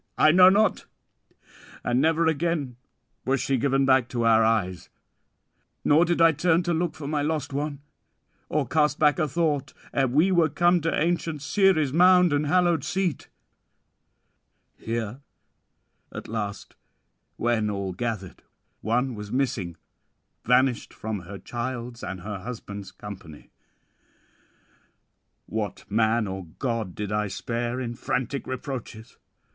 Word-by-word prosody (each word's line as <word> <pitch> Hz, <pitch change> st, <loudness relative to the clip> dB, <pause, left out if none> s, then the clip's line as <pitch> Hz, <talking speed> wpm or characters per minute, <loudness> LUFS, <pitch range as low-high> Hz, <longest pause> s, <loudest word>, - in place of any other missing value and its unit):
I 155 Hz, -, +6 dB
know 180 Hz, +2 st, +8 dB
not; 210 Hz, +3 st, +2 dB, 1.0 s
and 125 Hz, +2 st, +1 dB
never 160 Hz, +2 st, +2 dB
again 160 Hz, -4 st, 0 dB, 0.5 s
was 135 Hz, +1 st, +1 dB
she 135 Hz, +2 st, 0 dB
given 135 Hz, +1 st, +2 dB
back 130 Hz, -2 st, +3 dB
to 120 Hz, -2 st, -1 dB
our 115 Hz, 0 st, +5 dB
eyes; 100 Hz, -6 st, 0 dB, 1.0 s
nor 155 Hz, +4 st, +5 dB
did 175 Hz, 0 st, 0 dB
I 165 Hz, 0 st, +7 dB
turn 165 Hz, +3 st, +2 dB
to 175 Hz, 0 st, 0 dB
look 170 Hz, 0 st, -1 dB
for 155 Hz, -, -8 dB
my 150 Hz, 0 st, 0 dB
lost 150 Hz, -1 st, -2 dB
one, 145 Hz, 0 st, -3 dB, 0.7 s
or 150 Hz, -3 st, 0 dB
cast 150 Hz, -2 st, +2 dB
back 150 Hz, +1 st, +3 dB
a 155 Hz, -, +2 dB
thought, 150 Hz, -2 st, -1 dB, 0.2 s
ere 135 Hz, -1 st, +2 dB
we 155 Hz, +10 st, +3 dB
were 170 Hz, -3 st, +3 dB
come 175 Hz, +4 st, +3 dB
to 165 Hz, +1 st, 0 dB
ancient 165 Hz, -2 st, -1 dB
Ceres' 160 Hz, -6 st, +2 dB
mound 180 Hz, 0 st, +5 dB
and 145 Hz, +1 st, +1 dB
hallowed 175 Hz, -2 st, +2 dB
seat; 180 Hz, -2 st, -2 dB, 1.5 s
here 115 Hz, +2 st, -4 dB, 0.9 s
at -, -, -8 dB
last, 100 Hz, -1 st, -5 dB, 0.6 s
when 115 Hz, -2 st, +1 dB
all 100 Hz, -2 st, -3 dB
gathered, 110 Hz, -3 st, -4 dB, 0.4 s
one 125 Hz, +4 st, 0 dB
was 105 Hz, -1 st, -8 dB
missing, 110 Hz, -10 st, -1 dB, 0.7 s
vanished 125 Hz, 0 st, +2 dB
from 110 Hz, -1 st, -4 dB
her 95 Hz, +3 st, -9 dB
child's 120 Hz, +1 st, -5 dB
and 90 Hz, 0 st, -5 dB
her 100 Hz, +1 st, -5 dB
husband's 100 Hz, -3 st, -7 dB
company. 95 Hz, -7 st, -11 dB, 1.9 s
What 105 Hz, -4 st, -4 dB
man 110 Hz, +1 st, +2 dB
or 95 Hz, -2 st, -5 dB
god 115 Hz, -8 st, -2 dB
did 105 Hz, -1 st, -4 dB
I 105 Hz, 0 st, 0 dB
spare 120 Hz, +4 st, -3 dB
in 120 Hz, -2 st, -3 dB
frantic 125 Hz, +3 st, -3 dB
reproaches? 125 Hz, -4 st, -6 dB
130 Hz, 135 wpm, -25 LUFS, 110-155 Hz, 1.9 s, know